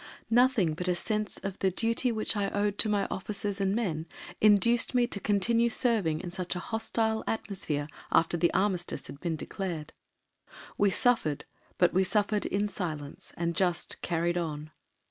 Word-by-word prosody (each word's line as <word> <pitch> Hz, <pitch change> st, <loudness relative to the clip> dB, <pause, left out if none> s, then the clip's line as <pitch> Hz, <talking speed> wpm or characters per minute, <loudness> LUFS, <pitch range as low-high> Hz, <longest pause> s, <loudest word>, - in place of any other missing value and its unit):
Nothing 240 Hz, -8 st, +4 dB
but 180 Hz, +3 st, -3 dB
a 180 Hz, -, +2 dB
sense 210 Hz, +1 st, -2 dB
of 195 Hz, -1 st, -4 dB
the 190 Hz, -, +3 dB
duty 230 Hz, +6 st, +1 dB
which 220 Hz, -1 st, -1 dB
I 200 Hz, -1 st, 0 dB
owed 205 Hz, 0 st, -1 dB
to 220 Hz, -, +5 dB
my 205 Hz, -2 st, +1 dB
officers 200 Hz, +1 st, -3 dB
and 195 Hz, +1 st, +1 dB
men 170 Hz, -8 st, -2 dB, 0.3 s
induced 230 Hz, +4 st, +4 dB
me 245 Hz, -1 st, +4 dB
to 225 Hz, -4 st, -3 dB
continue 230 Hz, +4 st, +2 dB
serving 210 Hz, -10 st, +1 dB
in 175 Hz, -, -6 dB
such 180 Hz, -1 st, -3 dB
a -, -, -2 dB
hostile 220 Hz, +2 st, -1 dB
atmosphere 165 Hz, -9 st, -2 dB, 0.2 s
after 165 Hz, +1 st, +3 dB
the 170 Hz, 0 st, +2 dB
armistice 185 Hz, -6 st, -1 dB
had 140 Hz, -, -9 dB
been 170 Hz, -1 st, -2 dB
declared. 165 Hz, -1 st, -5 dB, 0.8 s
We 205 Hz, -, +3 dB
suffered, 190 Hz, -, +1 dB, 0.3 s
but 175 Hz, -, +3 dB
we 190 Hz, +2 st, +4 dB
suffered 205 Hz, +2 st, +1 dB
in 205 Hz, +1 st, 0 dB
silence, 155 Hz, -8 st, -5 dB
and 170 Hz, 0 st, -1 dB
just 180 Hz, -3 st, 0 dB
"carried 175 Hz, +1 st, 0 dB
on." 155 Hz, -2 st, -4 dB
195 Hz, 165 wpm, -29 LUFS, 170-215 Hz, 0.8 s, to